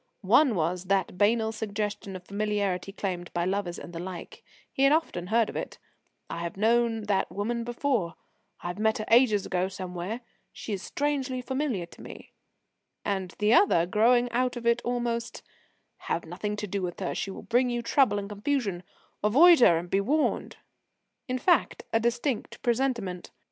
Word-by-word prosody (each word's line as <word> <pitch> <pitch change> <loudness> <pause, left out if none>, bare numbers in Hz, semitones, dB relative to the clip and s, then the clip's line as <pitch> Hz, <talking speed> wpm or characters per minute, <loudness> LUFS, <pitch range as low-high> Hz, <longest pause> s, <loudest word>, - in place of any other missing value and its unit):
One 245 +4 +5
was 175 +2 -1
that 190 -2 0
banal 220 +1 +3
suggestion 205 -2 -4
of 185 - -8
familiarity 200 -2 -1
claimed 180 -3 -4
by 170 0 +1
lovers 185 -2 -2
and 175 - -9
the 165 - -5
like 180 0 -7 0.3
he - - -2
had 275 +1 +6
often 240 - 0
heard 225 +2 +3
of - - -8
it - - -5 0.5
"I 170 - -5
have 170 +1 -5
known 225 +1 +2
that 205 -2 0
woman 230 +4 -2
before; 240 - -1 0.5
I 175 - -4
have 180 - -6
met 220 0 +2
her 215 - -4
ages 225 -4 +5
ago 185 0 0
somewhere; 185 +4 -5 0.3
she 215 - -6
is 195 - -3
strangely 280 -2 -2
familiar 260 - -2
to 170 - -16
me"; - - -11 0.7
and 190 -2 -2
the 210 +2 +3
other, 240 - +5
growing 240 +6 +3
out 250 +2 0
of 235 - -7
it 235 +1 +3
almost: 240 -1 -2 0.5
"Have 170 - -3
nothing 200 +5 -4
to 210 0 -4
do 200 0 -3
with 180 -2 -4
her; 185 - -2
she - - -3
will 190 - -8
bring 245 +2 +2
you 240 -1 -2
trouble 235 -4 +3
and 200 -1 -3
confusion; 210 -3 -2 0.4
avoid 315 +11 +7
her, 175 -9 +6
and 175 +1 -6
be 195 - +3
warned"; 295 +9 0 0.7
in 255 -1 -1
fact, 345 +8 +2
a 225 - +4
distinct 240 +2 -1
presentiment. 235 -7 -1
210 Hz, 175 wpm, -27 LUFS, 185-240 Hz, 0.7 s, avoid